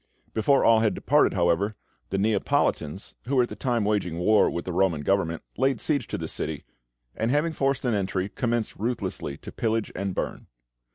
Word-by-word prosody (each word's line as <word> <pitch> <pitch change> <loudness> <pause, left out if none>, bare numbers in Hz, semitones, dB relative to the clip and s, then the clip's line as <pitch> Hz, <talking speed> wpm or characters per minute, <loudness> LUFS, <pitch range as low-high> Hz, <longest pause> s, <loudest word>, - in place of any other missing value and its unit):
Before 135 +5 +3
all 115 -1 +6
had 110 -1 +2
departed, 145 -5 +3
however, 85 +4 +1 0.3
the 95 - -1
Neapolitans, 100 -4 0
who 135 +3 -1
were 125 - +5
at 120 - -3
that - - -9
time 120 -5 0
waging 100 -6 0
war 105 +5 +4
with 85 - -4
the 90 - -3
Roman 90 -4 +1
Government, 85 -1 0
laid 135 +3 +2
siege 150 -3 0
to - - -3
the - - -4
city, - - -4 0.5
and 115 - -1
having 150 +5 +1
forced 135 -2 0
an 120 - +2
entry, 95 -2 -1
commenced 120 +1 -2
ruthlessly 110 - -3
to - - -10
pillage 110 -1 -1
and 95 -1 -3
burn. - - -4
105 Hz, 185 wpm, -26 LUFS, 95-125 Hz, 0.5 s, all